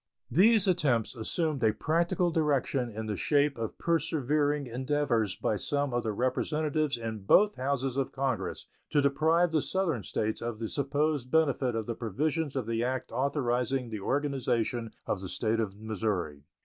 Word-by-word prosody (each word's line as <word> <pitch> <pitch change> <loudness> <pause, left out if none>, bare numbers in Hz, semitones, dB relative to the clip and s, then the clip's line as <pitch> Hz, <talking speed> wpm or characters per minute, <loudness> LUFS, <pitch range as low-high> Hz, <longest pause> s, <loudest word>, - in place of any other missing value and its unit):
These 205 - +5
attempts 140 - +1
assumed 145 +4 -1
a 110 -1 +4
practical 170 - +1
direction 140 -5 +1
in 110 0 -5
the 105 -1 -2
shape 145 +4 +2
of 115 -2 -4
persevering 150 -3 +1
endeavors 125 -5 0
by 105 - -1
some 145 +3 -1
of 120 - +1
the 110 - -2
Representatives 150 +5 0
in 115 -2 -4
both 205 - +4
Houses 135 0 -1
of 135 - 0
Congress 135 -3 -2 0.2
to 145 - +2
deprive 160 +5 +3
the 155 -2 +2
Southern 170 - -1
States 110 +2 -2
of 120 -1 -3
the 110 -1 -4
supposed 145 -1 0
benefit 140 -6 +2
of 110 -1 -2
the 115 - -2
provisions 145 - -2
of 130 -4 -1
the 115 +1 -1
act 130 +1 -2
authorizing 125 -1 0
the 110 - -4
organization 125 -2 -1 0.2
of 95 - -2
the 95 - -6
State 115 +3 0
of 100 -2 -3
Missouri. 100 -9 -3
130 Hz, 160 wpm, -29 LUFS, 115-150 Hz, 0.2 s, These